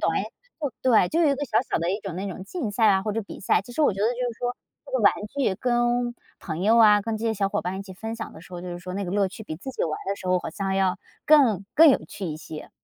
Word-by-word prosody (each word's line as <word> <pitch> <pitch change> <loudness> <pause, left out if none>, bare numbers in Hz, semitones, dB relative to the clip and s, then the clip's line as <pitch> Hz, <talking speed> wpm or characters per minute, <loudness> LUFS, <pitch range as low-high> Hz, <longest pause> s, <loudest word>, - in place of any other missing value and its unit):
短 - - +1
诶。 - - -1 0.6
对， 225 -8 +4
就 330 - +1
有 310 - +5
一 280 - +3
个 285 - -5
小 - - -1
小 - - +1
的 170 +2 0
一 200 - -1
种 195 -5 -6
那 195 +2 -3
种 185 0 -7
竞 265 - -4
赛 220 +2 +2
啊， 190 -1 +4
或 210 0 -2
者 225 - -2
比 200 - -10
赛， 190 - +2
其 245 - -12
实 310 - -3
我 290 - +4
觉 195 - -5
得 215 - +3
就 245 - -1 0.2
是 225 - -19
说 245 0 -2 0.3
这 - - -13
个 - - +2
玩 - - +7 0.2
具 265 -9 +1
跟 240 +1 0 0.2
朋 165 -1 -5
友 225 +3 +4
啊， 210 -2 +7
跟 220 +2 -3
这 220 - -5
些 225 - +2
小 200 -2 0
伙 205 +1 -2
伴 185 +2 -3
一 - - -5
起 190 -2 -11
分 225 +4 -5
享 225 -1 -6
的 160 - -12
时 185 - -16
候， 175 - -5
就 180 - -7
是 175 0 -5
说 180 +1 -7
那 200 - -2
个 175 - -4
乐 200 0 +2
趣 220 - -10
比 155 -6 -6
自 265 - -7
己 260 - -3
玩 155 -2 -3
的 200 - +1
时 185 - -9
候 180 0 +3
好 - - -6
像 195 +3 -2
要 190 -1 +1 0.3
更 250 - +5
更 325 0 +8
有 270 - +5
趣 195 - -6
一 155 -2 -4
些。 155 0 -9
205 Hz, 340 characters per minute, -25 LUFS, 185-240 Hz, 0.6 s, 更